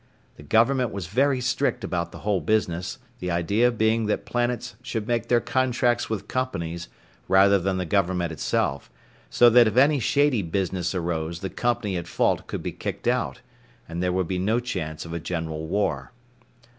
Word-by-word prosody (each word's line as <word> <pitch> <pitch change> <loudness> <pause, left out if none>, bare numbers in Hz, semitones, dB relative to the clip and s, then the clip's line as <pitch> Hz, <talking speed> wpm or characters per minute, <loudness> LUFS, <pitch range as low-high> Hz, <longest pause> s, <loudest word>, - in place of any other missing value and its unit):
The - - -14
Government 115 - +2
was 100 -3 -5
very 130 - +2
strict 120 0 0
about 85 -1 -2
the - - -10
whole 100 -4 +1
business, 90 -1 -1 0.2
the 90 - -3
idea 100 +8 +2
being 110 -1 +1
that 105 - -1
planets 120 -3 -2
should 110 -4 -4
make 120 -1 0
their 120 - +4
contracts 125 -1 +1
with 105 -2 -3
companies 85 -10 -3 0.4
rather 100 +1 +5
than 95 +1 -1
the 90 - -2
government 90 -2 0
itself, 80 - -1 0.4
so 120 - +5
that 120 0 +7
if 110 +2 -2
any 140 +2 +5
shady 140 -2 +2
business 95 0 -2
arose 85 -1 -2
the 95 - -4
company 120 -6 -1
at 85 - -5
fault - - 0
could - - -5
be - - -3
kicked - - -5
out, - - 0 0.5
and 85 +1 -4
there 90 0 +1
would 90 -1 0
be 90 0 -2
no 110 +6 +1
chance 85 -10 -4
of 85 - -7
a 85 - -2
general 80 -2 -4
war. 80 -8 -1
100 Hz, 180 wpm, -25 LUFS, 85-120 Hz, 0.5 s, that